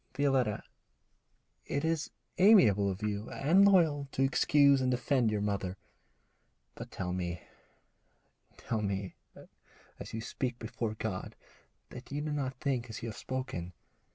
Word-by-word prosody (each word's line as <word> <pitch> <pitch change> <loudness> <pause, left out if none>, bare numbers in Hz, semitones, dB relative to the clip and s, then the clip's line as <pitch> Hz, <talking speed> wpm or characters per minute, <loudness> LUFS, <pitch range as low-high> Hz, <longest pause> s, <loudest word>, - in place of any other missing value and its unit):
'Violetta, 135 -7 +1 1.0
it 140 +2 -1
is 165 -1 -1 0.3
amiable 115 - +6
of 95 +2 -5
you, 105 +1 -2
and 175 +8 +4
loyal, 160 -7 +3
to 135 - +1
excuse 140 0 +4
and 130 - +1
defend 125 -1 +1
your 105 -1 -1
mother, 100 -2 -2 1.0
but - - -9
tell 90 -1 -4
me 85 -3 -4 1.1
tell 110 -2 -3
me, 100 -2 -3 0.9
as - - -8
you 110 - -4
speak 120 +1 -3
before 115 -1 -4
God, 105 -4 -4 0.6
that 125 +2 -10
you 145 - -2
do 150 +1 -3
not 135 -3 -2
think 125 -3 -2
as 110 - -7
you 115 - -3
have 110 - -8
spoken. 130 -10 -5
125 Hz, 140 wpm, -31 LUFS, 105-140 Hz, 1.1 s, amiable